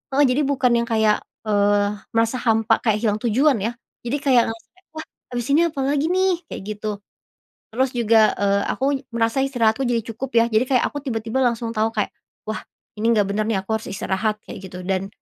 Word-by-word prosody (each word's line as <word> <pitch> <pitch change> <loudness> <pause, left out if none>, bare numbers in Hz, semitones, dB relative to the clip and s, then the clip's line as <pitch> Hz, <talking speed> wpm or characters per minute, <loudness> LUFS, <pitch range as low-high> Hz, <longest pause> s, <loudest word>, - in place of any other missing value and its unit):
heeh, 290 - +5
jadi 255 +4 +2
bukan 260 -3 +2
yang 235 - -2
kayak, 220 -2 +3 0.3
eee, 205 -1 +2 0.3
merasa 230 +2 +2
hampa 225 -1 +2
kayak 220 -3 +2
hilang 215 -2 +1
tujuan 255 +5 +3
ya, 230 - 0 0.4
jadi 270 +5 0
kayak 255 -4 +5
ngerasa, 225 +11 -10 0.2
"Wah 315 - -6 0.3
habis 240 -1 -2
ini 305 +4 +5
apa 305 -4 -6
lagi 285 +2 +1
nih?" 375 0 +2
kayak - - -7
gitu, 215 +1 -7 0.8
terus 260 +4 +1
juga, 225 -2 +4
eee, 200 0 +2
aku 265 - -6 0.3
merasa 230 +2 0
istirahatku 245 -1 +1
jadi 240 -1 +1
cukup 255 +4 -5
ya 230 0 +6
jadi 220 +3 +2
kayak 255 -1 +2
aku 290 - -7
tiba-tiba 225 0 -2
langsung 235 -1 0
tahu 220 +1 +1
kayak, 210 -3 -1 0.4
"Wah 215 - -3 0.4
ini 220 - -2
nggak 210 -3 +3
bener 210 +1 0
nih 225 - +1
aku 220 +3 -1
harus 220 - -12
istirahat." 210 +3 -1
kayak - - -9
gitu 180 0 -8
dan, 190 +1 -1
225 Hz, 195 wpm, -22 LUFS, 215-255 Hz, 0.8 s, ya